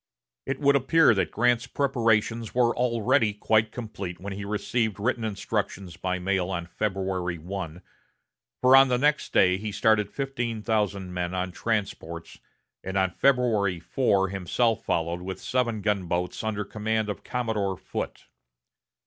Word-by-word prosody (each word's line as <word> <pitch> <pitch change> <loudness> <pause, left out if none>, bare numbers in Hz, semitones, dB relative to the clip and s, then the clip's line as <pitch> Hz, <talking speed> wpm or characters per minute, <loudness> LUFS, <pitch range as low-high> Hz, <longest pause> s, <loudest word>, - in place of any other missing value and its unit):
It 135 0 -2
would 140 -1 +4
appear 140 +1 +5
that 95 -4 0
Grant's 120 +1 +1
preparations 115 -4 0
were 120 -1 +3
already 120 -1 +2
quite 110 +1 +2
complete 100 -7 -6
when 100 +1 -5
he 100 +1 -6
received 105 +1 -1
written 120 +2 0
instructions 100 -3 -3
by 90 +1 -2
mail 95 0 0
on 85 -3 -3
February 95 -1 -2
1, 90 0 -6 0.8
for 130 +1 +7
on 135 0 +8
the 125 -1 +2
next 150 +3 +1
day 90 0 +4
he 105 +2 -4
started 105 0 +2
fifteen 120 -5 -3
thousand 100 -4 -1
men 90 0 -2
on 90 0 -2
transports, 90 -6 -3 0.4
and 95 +1 -3
on 95 -1 +2
February 110 -8 +2
4 95 0 +1
himself 105 +5 0
followed 85 +2 -1
with 95 +1 -5
seven 120 -4 -1
gunboats 90 -3 -1
under 105 -1 -2
command 110 +1 -1
of 105 - -5
Commodore 110 -6 -2
Foote. - - -6
105 Hz, 145 wpm, -26 LUFS, 95-120 Hz, 0.8 s, on